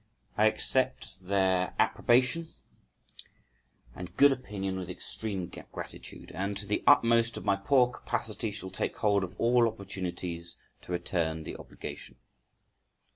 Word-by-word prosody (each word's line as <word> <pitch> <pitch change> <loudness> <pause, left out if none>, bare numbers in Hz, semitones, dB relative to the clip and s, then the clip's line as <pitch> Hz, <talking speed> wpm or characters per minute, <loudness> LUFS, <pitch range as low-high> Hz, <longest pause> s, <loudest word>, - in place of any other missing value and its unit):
I 110 - +5
accept 115 -3 0
their 95 -2 +2
approbation 125 +7 +3 1.5
and 90 +5 -9
good 140 0 +8
opinion 100 -7 -3
with 90 -1 -6
extreme 95 +1 -4 0.3
gratitude, - - -8
and 100 +1 -2
to 105 - -4
the 105 +1 -1
utmost 115 -4 +5
of - - -7
my 100 - +4
poor 125 +5 +3
capacity 115 -2 -2
shall 100 -2 -6
take - - -3
hold 100 -2 +2
of 90 +2 -6
all 120 0 +4
opportunities 90 -5 -5 0.2
to - - -10
return 85 -2 -1
the - - -6
obligation. - - -8
100 Hz, 130 wpm, -30 LUFS, 90-115 Hz, 1.5 s, good